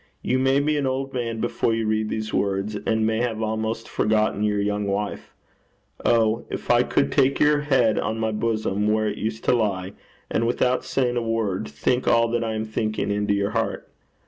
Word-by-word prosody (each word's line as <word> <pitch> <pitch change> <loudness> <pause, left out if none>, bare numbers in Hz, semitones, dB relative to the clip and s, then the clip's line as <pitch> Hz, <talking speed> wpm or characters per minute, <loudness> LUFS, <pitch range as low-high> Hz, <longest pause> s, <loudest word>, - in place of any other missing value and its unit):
You 130 - +1
may 135 +1 +3
be 150 +1 +1
an 140 -2 0
old 135 +1 -2
man 115 -3 -3
before 115 0 0
you 115 0 -1
read 110 0 0
these 110 0 -3
words, 100 +1 0
and 110 0 +2
may 110 +1 +1
have 115 -3 -1
almost 110 +1 -2
forgotten 105 -1 +1
your 105 -1 +1
young 105 0 -1
wife. 100 +1 -3 0.7
Oh! 115 -1 +2
if - - -2
I 120 0 +5
could 140 - +1
take 135 +1 +2
your 150 0 +4
head 130 -7 +2
on 110 - -2
my 110 0 -1
bosom 105 -2 -1
where 110 0 +1
it 105 - -3
used 110 +1 -3
to - - +3
lie, 100 -4 -1 0.3
and 115 - 0
without 125 +1 +1
saying 125 -2 0
a - - +1
word, 115 -7 -1
think 75 - -1
all 115 0 +4
that 120 0 0
I 110 -1 -2
am 110 0 -2
thinking 110 -1 -2
into 105 0 +1
your 100 0 0
heart. - - -2
110 Hz, 200 wpm, -24 LUFS, 105-120 Hz, 0.7 s, I